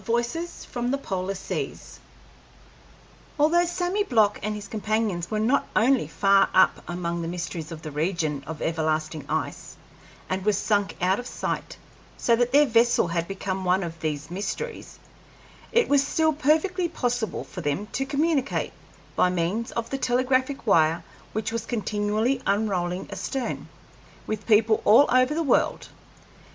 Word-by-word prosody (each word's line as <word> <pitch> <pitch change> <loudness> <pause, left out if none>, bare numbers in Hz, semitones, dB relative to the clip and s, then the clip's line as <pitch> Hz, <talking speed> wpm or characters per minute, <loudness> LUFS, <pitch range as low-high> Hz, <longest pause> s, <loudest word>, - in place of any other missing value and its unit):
VOICES 240 - -2
FROM 245 0 -3
THE 275 - +1
POLAR 190 -6 -3
SEAS 190 - -5 1.4
Although 340 +4 +4
Sammy 355 +3 0
Block 220 - +2
and 210 +1 -2
his 210 -1 -7
companions 215 -5 -1
were 215 - -1
not 235 +6 +2
only 250 +4 +3
far 195 0 +3
up 190 - +5
among 170 -1 -2
the 165 - -3
mysteries 170 -2 -5
of 160 -1 -8
the 155 - -6
region 155 -2 -1
of 160 -2 -5
everlasting 155 -2 -1
ice, - - -3 0.5
and 185 0 -2
were 210 +1 +3
sunk 205 0 0
out 190 +4 +3
of 245 - -6
sight, - - -4 0.4
so 235 - +3
that 245 +1 +1
their 290 +2 +6
vessel 230 -6 +3
had 170 0 -1
become 190 -1 -3
one 185 +1 +2
of 165 -1 -6
these 155 0 -3
mysteries, 205 - -5 0.7
it 475 0 +3
was 285 -1 +4
still 315 +2 +1
perfectly 320 +5 +1
possible 245 -7 -2
for 180 - -8
them 145 +7 -1
to 270 - -1
communicate, 285 0 0 0.4
by 180 - +4
means 180 +6 -1
of 235 -1 -3
the 270 - -2
telegraphic 255 +2 +1
wire 165 -5 +3 0.3
which 220 +1 -2
was 230 -1 -2
continually 215 +3 0
unrolling 190 -3 0
astern, 270 -2 -4 0.6
with 215 -1 -4
people 220 0 +4
all 230 +7 +7
over 255 +3 +4
the 330 - 0
world. 285 - +1
215 Hz, 150 wpm, -25 LUFS, 180-260 Hz, 1.4 s, all